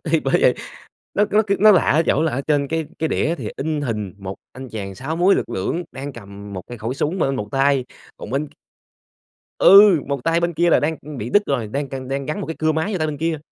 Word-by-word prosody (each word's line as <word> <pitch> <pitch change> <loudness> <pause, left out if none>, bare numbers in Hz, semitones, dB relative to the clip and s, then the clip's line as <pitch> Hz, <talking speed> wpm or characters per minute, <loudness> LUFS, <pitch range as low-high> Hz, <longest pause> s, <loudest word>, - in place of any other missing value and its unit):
thì - - +1
bởi - - -1
vậy. - - +4 0.6
Nó 210 - +3
nó 215 +1 +4
c - - -15
nó 215 +1 +8
lạ 185 - +4
ở 155 +4 +4
chỗ 150 - +2
là 160 - 0
ở 130 - -1
trên 145 -2 +1
cái 160 0 -2
cái 160 - 0
đĩa 160 - 0
thì - - -4
in 155 +1 -2
hình 105 -8 -3
1 95 -1 -6 0.2
anh 130 +1 -9
chàng 100 -4 -6
6 140 - -4
múi 180 +3 +4
lực - - -2
lưỡng 160 - -2
đang 140 +2 -6
cầm 100 -2 -11
một 95 -2 -6
cái 120 - -9
khẩu 115 +3 -3
súng 160 +7 -2
bên 135 -5 0
một 105 -3 -4
tay, 135 -1 +2 0.3
còn - - -9
bên 140 +4 -2
c - - -26 1.1
Ừ! 195 -4 +8
Một 140 -2 -3
tay 165 +1 +2
bên 170 0 -1
kia 170 +2 +2
là - - +4
đang, 155 +2 -1
ừm, 150 -1 -8
bị 115 +2 -5
đứt 205 - +4
rồi, 125 -6 -1
đang 140 +6 -3
c - - -23 0.2
đang 135 0 -2
gắn 155 +7 -3
một - - -4
cái 160 - -5
cưa 155 0 +1
máy 160 +7 -1
vô 190 - -1
tay 155 - 0
bên 150 -2 -4
kia, 165 0 -1
145 Hz, 270 wpm, -21 LUFS, 125-165 Hz, 1.1 s, nó